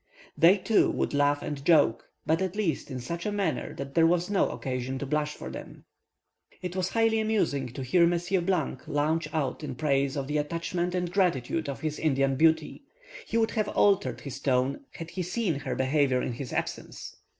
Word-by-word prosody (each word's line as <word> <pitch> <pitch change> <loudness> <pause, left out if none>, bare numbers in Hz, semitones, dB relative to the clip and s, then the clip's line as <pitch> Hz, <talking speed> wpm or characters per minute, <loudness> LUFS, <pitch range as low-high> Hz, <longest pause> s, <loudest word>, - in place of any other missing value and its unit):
They, 180 +5 +6
too, 210 +3 +3
would - - -1
laugh 145 0 +2
and 145 -2 -5
joke, 145 -8 +3 0.2
but, 160 +2 +1
at 190 0 -2
least, 200 -9 -1
in 130 -2 -4
such 170 +7 -5
a - - 0
manner 205 -2 -2
that 135 0 -6
there 165 +1 +5
was 175 +3 +1
no 200 - +2
occasion 130 0 -3
to 140 - -4
blush 150 +1 -1
for - - -7
them. - - -10 0.8
It 180 0 -4
was 185 -1 0
highly 225 -1 +2
amusing 210 - 0
to 135 - -5
hear 170 +7 +4
Monsieur 175 +2 +1
launch 155 -2 -1
out 145 -2 -2
in 135 -4 -4
praise 140 -1 +1
of 140 - -2
the 150 +2 -1
attachment 170 +3 -2
and 180 -1 -2
gratitude 165 -5 +1
of 140 - -5
his 155 -1 -3
Indian 135 -3 +2
beauty; 160 - +2 0.5
he 230 - -1
would 225 -1 +2
have 215 -2 0
altered 195 -15 +2
his 135 -2 -7
tone 135 - 0
had 165 0 -7
he 185 - -3
seen 180 -3 -1
her - - -3
behaviour 130 -1 +2
in - - -2
his 125 +1 -6
absence. - - -5
155 Hz, 195 wpm, -28 LUFS, 140-180 Hz, 0.8 s, They